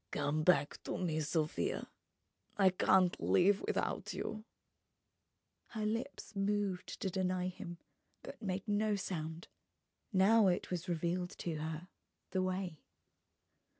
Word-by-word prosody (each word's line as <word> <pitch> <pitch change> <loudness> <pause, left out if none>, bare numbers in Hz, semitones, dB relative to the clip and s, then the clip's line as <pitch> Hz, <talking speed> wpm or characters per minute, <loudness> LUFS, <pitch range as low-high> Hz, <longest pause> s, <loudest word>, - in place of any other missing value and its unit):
"Come 150 +7 0
back 150 -4 +3
to - - -2
me, 160 -4 0
Sofia! 155 +1 -1 0.7
I 195 -2 +6
can't 185 0 +4
live 195 +2 +4
without - - -1
you 215 0 -4 0.6
..." - - -51
Her 215 -1 -1
lips 230 +2 -3
moved 200 -2 -1
to 190 - -1
deny 185 -1 0
him, 180 -2 -7 0.5
but - - -9
made 195 0 -3
no 210 0 +2
sound. 165 -4 -4 0.6
Now 205 +2 +6
it 180 0 +1
was 180 0 -3
revealed 175 +1 -1
to 165 -3 -3
her, 160 +3 -4 0.4
the 185 - +1
way. 185 -3 -2
185 Hz, 125 wpm, -35 LUFS, 170-200 Hz, 0.7 s, I